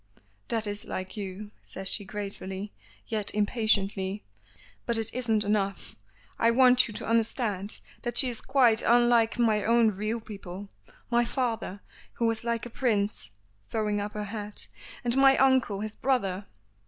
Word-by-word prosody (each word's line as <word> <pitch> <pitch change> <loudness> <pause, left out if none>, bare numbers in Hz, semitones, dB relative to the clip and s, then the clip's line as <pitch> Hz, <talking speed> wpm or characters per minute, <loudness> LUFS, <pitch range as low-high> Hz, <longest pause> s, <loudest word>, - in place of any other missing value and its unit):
"That 225 -2 0
is 205 0 -3
like 185 +3 -5
you," 205 0 -6
says 190 0 -7
she 205 - +1
gratefully, 200 0 -6 0.3
yet 215 -3 -2
impatiently. 205 -2 +1 0.6
"But 235 -1 +2
it 225 0 -2
isn't 225 -4 +1
enough. 200 -2 -1 0.4
I 230 - +4
want 250 +1 +5
you 215 - -8
to - - -5
understand 220 -3 0 0.2
that 240 -1 -1
she 265 - +8
is 240 -2 -3
quite 250 -5 +3
unlike 240 -1 +4
my 220 -3 +2
own 230 0 +4
real 215 +4 -2
people 200 -2 -9 0.4
my 240 0 +4
father, 230 -5 -2 0.3
who 235 - -1
was 225 0 0
like 235 0 -1
a - - -6
prince," 210 - 0 0.4
throwing 210 - -1
up 205 +1 -5
her 210 - -3
head, 210 0 -4 0.4
"and 240 0 +1
my 270 0 +6
uncle, 260 -7 +3
his 215 0 -3
brother." 200 -8 -1
220 Hz, 155 wpm, -28 LUFS, 205-235 Hz, 0.6 s, she